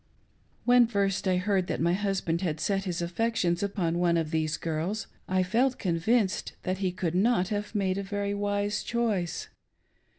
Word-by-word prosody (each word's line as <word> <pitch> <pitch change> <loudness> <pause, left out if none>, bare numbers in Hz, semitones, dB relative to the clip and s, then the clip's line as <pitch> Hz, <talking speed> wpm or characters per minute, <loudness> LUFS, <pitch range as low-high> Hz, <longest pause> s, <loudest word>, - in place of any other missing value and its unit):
When 245 -1 +6
first 200 -3 0
I 185 -1 +3
heard 190 -1 +1
that - - -2
my 170 +2 +2
husband 190 -4 -1
had 160 -5 -1
set 195 +3 0
his 175 -2 -2
affections 175 -1 0
upon 180 -4 -1
one 170 -1 +3
of 160 -2 -1
these 160 -1 0
girls, 170 +6 -2 0.2
I 185 0 +2
felt 245 +8 +1
convinced 190 +4 +1
that 185 +1 -2
he 190 -2 0
could 175 -2 -2
not 190 -1 +2
have 210 +1 -3
made 195 -1 +1
a - - -1
very 200 0 -2
wise 205 +1 -1
choice. 215 -8 -1
190 Hz, 170 wpm, -28 LUFS, 175-205 Hz, 0.2 s, When